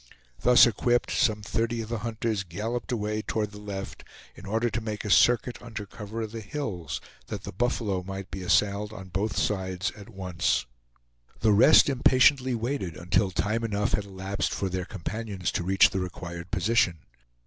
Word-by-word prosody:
Thus 125 0 +7
equipped, 120 +1 +1
some 110 -6 +1
thirty 115 +3 -1
of 110 - -10
the 115 -1 -2
hunters 110 -1 -2
galloped 110 +9 -4
away 105 -2 -1
toward 105 -1 -2
the 105 0 -10
left, 100 -2 -6 0.3
in - - -12
order 110 +4 +1
to 115 0 -2
make 110 -1 -4
a 105 - -1
circuit 120 +2 +4
under 110 -3 -7
cover 110 +2 -6
of 110 - -6
the 115 0 -6
hills, 105 - -4 0.3
that - - -5
the - - -6
buffalo 105 -3 -1
might 95 +1 -7
be 95 - -5
assailed 100 +3 +1
on 95 -3 -9
both 100 +4 -2
sides 95 -2 -1
at 105 +2 -13
once. 90 -4 -1 0.8
The 110 - +4
rest 120 +9 +7
impatiently 130 -1 +4
waited 115 - -3
until 90 +3 +1
time 110 +5 -1
enough 105 0 0
had 105 - 0
elapsed 95 0 -3
for 95 - -1
their 90 0 -3
companions 100 0 -4
to - - -2
reach 95 +1 +5
the 95 - -1
required 85 -1 -6
position. 95 -5 +1
105 Hz, 175 wpm, -27 LUFS, 95-115 Hz, 0.8 s, Thus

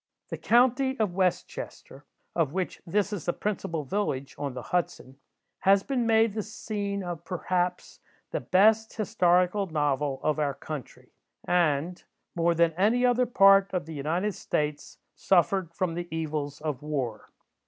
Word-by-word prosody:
The - - -4
county 260 +2 +3
of 210 -5 0
West 185 -1 +1
Chester, - - -10 0.3
of 160 -4 +1
which 185 -1 -3
this 205 +3 0
is 195 - -5
the 175 - 0
principal 170 -6 -3
village 140 -6 -2
on 140 -3 -4
the 125 - -6
Hudson, 160 -6 -3 0.4
has 195 0 +4
been 250 -4 -1
made 225 -1 +4
the 215 - -2
scene 200 -1 -4
of, 175 -2 -6
perhaps, 180 0 -2 0.3
the - - -1
best 220 +4 +3
historical 185 -1 +2
novel 145 -3 -1
of 155 0 +1
our 145 -2 0
country, 150 -5 -8 0.3
and, 170 0 +1 0.3
more 170 0 +1
than 170 0 +3
any 220 +8 +2
other 250 0 +3
part 195 -3 +5
of 180 -5 -1
the 160 - -8
United 165 +8 -1
States, 150 -3 -3 0.2
suffered 185 -1 +2
from 170 0 -2
the 175 +1 -4
evils 155 -3 -4
of 150 -5 -3
war. 135 -7 -4
180 Hz, 155 wpm, -27 LUFS, 155-205 Hz, 0.4 s, part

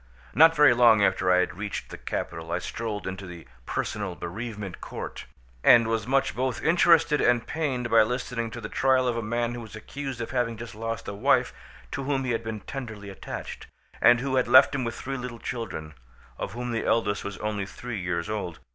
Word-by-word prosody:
Not 160 +2 +7
very 150 -4 +7
long 115 -3 +6
after 90 -2 +2
I 90 0 +5
had 90 - -2
reached 105 -1 -5
the - - -7
capital 80 -1 -4
I - - +1
strolled 105 +2 -4
into 95 +1 -5
the 85 -2 -10 0.2
Personal 100 -4 -3
Bereavement 105 +1 -6
Court, - - -7 0.4
and 115 -1 +7
was 110 -1 -1
much 135 +1 +1
both 130 -1 -1
interested 165 -2 +4
and 120 -1 +3
pained 135 -6 -2
by 115 - +7
listening 115 0 -1
to 120 - -7
the 105 - -5
trial 130 +2 +2
of 120 - 0
a 115 - -1
man 120 +2 -1
who 120 - -6
was 110 -1 -10
accused 135 +3 -6
of 115 0 -4
having 120 -3 -1
just 115 +1 -8
lost 115 +1 -5
a 100 - -4
wife 100 - +2 0.4
to - - -3
whom 135 -1 0
he 130 - -1
had 115 0 -1
been 110 -2 -5
tenderly 110 -8 -7
attached, 95 - -7 0.3
and 120 0 +6
who 130 0 0
had 130 - +2
left 130 +3 +7
him 135 -2 -1
with 115 -1 -3
three 135 +1 -4
little 125 -1 -6
children, 95 -12 -5 0.5
of 100 - -4
whom 120 +1 -4
the 115 - -1
eldest 105 -3 +1
was 100 -2 -5
only 105 -2 -3
three 115 +1 -6
years 90 -1 -2
old. 100 -6 -4
115 Hz, 210 wpm, -26 LUFS, 105-125 Hz, 0.5 s, Not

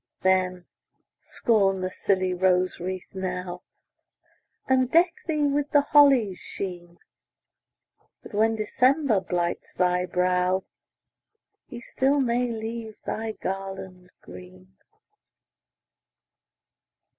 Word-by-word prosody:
Then, 185 -1 +1 0.6
scorn 195 -4 +1
the 185 0 -2
silly 185 -1 0
rose 185 0 +1
wreath 185 +1 -6
now, 180 -1 -4 1.1
And 260 -1 +2
deck 340 +4 +4
thee 305 -2 0
with 285 0 0
the 290 - +4
holly's 275 -9 +4
sheen, 175 -3 -7 1.3
That, - - -12
when 220 +2 +2
December 250 +2 +2
blights 175 -2 -3
thy 180 0 +1
brow, 180 +1 +1 1.0
He 240 -3 -9
still 270 +4 +1
may 245 -1 +1
leave 225 0 -6
thy 220 0 -3
garland 190 -2 -6
green. 90 +1 -14
190 Hz, 95 wpm, -25 LUFS, 180-240 Hz, 1.3 s, deck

